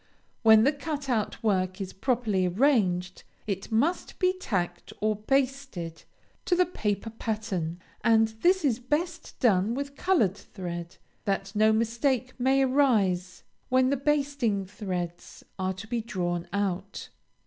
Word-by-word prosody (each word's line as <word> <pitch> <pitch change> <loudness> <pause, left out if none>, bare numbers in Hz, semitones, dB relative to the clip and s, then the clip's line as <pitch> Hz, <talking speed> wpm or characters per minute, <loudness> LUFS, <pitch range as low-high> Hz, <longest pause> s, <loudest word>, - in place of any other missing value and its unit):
When 220 -1 +7
the 275 - +5
cut 290 -1 -5
out 225 -3 -1
work 185 -3 +1
is 190 -1 -5
properly 215 -4 +1
arranged, 185 -5 +1 0.2
it 200 +1 -4
must 285 +11 0
be 365 -1 +3
tacked 180 - -3
or 215 0 +1
basted 255 - -2 0.4
to 355 - +3
the 360 +1 +4
paper 215 - -2
pattern; 210 -7 -3 0.2
and 225 -1 +4
this 365 -1 +4
is 245 -4 +2
best 320 +6 -3
done 215 -1 +3
with 280 +1 -4
colored 280 - +2
thread, 175 -4 -7 0.3
that 195 -1 -1
no 215 +1 +5
mistake 235 +3 0
may 265 +2 +3
arise 210 -10 +2 0.3
when 255 +1 +3
the - - +3
basting 275 -7 0
threads 180 -3 -5
are 185 0 0
to 190 +4 -9
be 235 +1 -2
drawn 175 -5 -2
out. 200 0 -3
220 Hz, 135 wpm, -27 LUFS, 190-270 Hz, 0.4 s, When